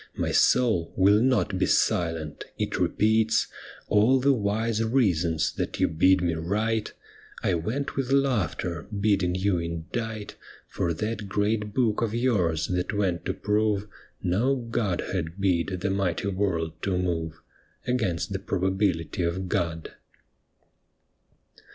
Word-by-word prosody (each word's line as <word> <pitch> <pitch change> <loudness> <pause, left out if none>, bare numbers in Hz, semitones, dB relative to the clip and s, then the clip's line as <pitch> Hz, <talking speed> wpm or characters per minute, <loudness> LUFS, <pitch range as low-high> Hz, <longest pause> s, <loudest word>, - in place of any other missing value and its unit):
My - - -1
soul 110 -10 +3
will 100 +3 +5
not 125 -7 +1
be - - +2
silent; 80 -3 0
it - - -2
repeats 110 +1 +2 0.4
All 110 +6 +4
the 140 +2 +4
wise 110 0 0
reasons 90 -10 +1
that - - -4
you - - +4
bid 95 +4 +3
me 85 -1 +1
write 105 +7 -1 0.5
(I - - +2
went 110 - -2
with 135 -1 -2
laughter, 100 - 0
bidding 100 -4 +2
you 95 -1 +1
indite 100 +7 -5 0.3
For 85 - -2
that 105 +3 -3
great 105 +1 -1
book 115 -5 +1
of 115 -1 -1
yours 90 -11 +1
that 90 +3 -1
went 90 -5 0
to - - -1
prove 105 -1 0 0.4
No 115 +10 +2
Godhead 100 -7 -2
bid 90 -4 +1
the 100 - 0
mighty 95 0 -1
world 85 -5 -2
to 95 -2 0
move) 80 -3 -2 0.5
Against 110 -10 -1
the - - -2
probability 95 -2 -1
of 90 +2 -1
God. 85 -2 -2
100 Hz, 130 wpm, -26 LUFS, 85-110 Hz, 0.5 s, will